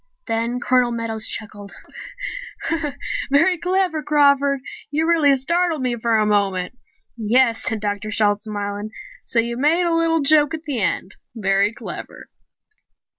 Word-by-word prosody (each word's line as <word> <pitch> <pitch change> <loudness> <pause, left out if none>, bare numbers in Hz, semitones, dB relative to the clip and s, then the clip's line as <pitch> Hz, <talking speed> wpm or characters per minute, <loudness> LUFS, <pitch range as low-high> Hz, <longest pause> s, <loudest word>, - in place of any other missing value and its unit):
Then 230 +2 -1
Colonel 250 -1 +2
Meadows 230 -2 -2
chuckled. 205 -2 -6 1.6
"Very 325 +6 +3
clever, 360 -2 0
Crawford! 280 -2 +3 0.3
You 310 +3 0
really 310 -5 +4
startled 335 +2 0
me 250 -1 0
for 230 -1 +1
a 215 - +2
moment." 200 -1 0 0.4
"Yes," 230 +1 +2
said 220 -2 -2
Dr. 205 0 -3
Shalt, 210 -1 +1
smiling. 205 0 -4 0.4
"So - - -2
you 235 +1 +1
made 310 +7 +3
a 340 - +1
little 330 -1 +2
joke 295 +2 +4
at 315 - -9
the 275 -8 -3
end. 185 0 -2 0.2
Very 200 -1 +2
clever." - - -8
240 Hz, 135 wpm, -21 LUFS, 215-300 Hz, 1.6 s, really